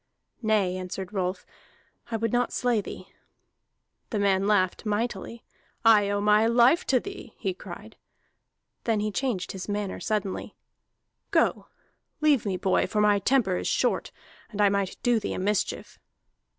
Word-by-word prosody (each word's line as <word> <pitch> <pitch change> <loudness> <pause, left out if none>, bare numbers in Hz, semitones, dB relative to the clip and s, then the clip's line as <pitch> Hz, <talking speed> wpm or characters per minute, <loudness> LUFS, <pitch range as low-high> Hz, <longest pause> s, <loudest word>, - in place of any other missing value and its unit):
"Nay," 210 -5 +1
answered 185 +1 -6
Rolf, 185 -1 -2 0.6
"I 225 - -1
would 225 0 -2
not 245 0 +1
slay 245 -4 +1
thee." - - -9 1.0
The 220 - -2
man 200 -1 +2
laughed 185 -3 +2
mightily. 225 +1 -3 0.4
"I 210 -3 +6
owe 205 0 0
my 210 +2 +4
life 240 +8 +4
to 255 - +4
thee!" 390 - -9
he 190 - -2
cried. 180 - -11 0.9
Then 225 -2 +1
he 210 0 -1
changed 205 -6 -2
his 190 +1 -7
manner 205 -1 -3
suddenly. 210 -3 -3 0.7
"Go, - - +1 0.5
leave 295 -8 +3
me, 190 -2 -1
boy, 190 +1 +1
for 210 - -1
my 210 -1 +4
temper 200 -4 +2
is - - -3
short, - - 0 0.4
and 210 - -8
I 205 -1 +5
might 200 -1 -1
do 240 -2 +3
thee - - -4
a - - -4
mischief!" 205 +2 -2
210 Hz, 150 wpm, -26 LUFS, 195-230 Hz, 1.0 s, I